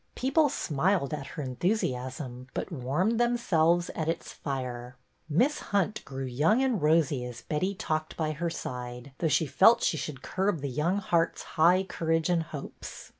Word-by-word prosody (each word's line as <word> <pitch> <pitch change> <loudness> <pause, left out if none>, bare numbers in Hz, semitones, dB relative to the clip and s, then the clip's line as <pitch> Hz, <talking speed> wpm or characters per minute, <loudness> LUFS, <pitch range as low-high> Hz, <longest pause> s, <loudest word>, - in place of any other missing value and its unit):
People 290 +4 +3
smiled 160 - 0
at 140 -2 -4
her 150 - -2
enthusiasm 130 - -2
but - - -3
warmed 165 - 0
themselves 175 -8 +2
at 160 0 -2
its 165 - -3
fire. 125 -3 -5 0.3
Miss 245 - +2
Hunt 205 +1 -1
grew 135 0 -5
young 155 - +2
and 250 -7 +1
rosy 150 -4 +3
as 125 -1 -7
Betty 185 +6 -1
talked 155 -3 -3
by 155 -2 0
her 170 +3 -2
side, 125 -4 -6
though 165 - +1
she 160 +1 +2
felt 190 - +5
she 160 - +2
should 140 -2 -5
curb 190 -4 0
the 140 - -2
young 155 +9 0
heart's 170 -4 0
high 175 +4 +5
courage 165 -3 0
and 170 -2 +3
hopes. 155 -3 -8
160 Hz, 165 wpm, -29 LUFS, 135-185 Hz, 0.3 s, felt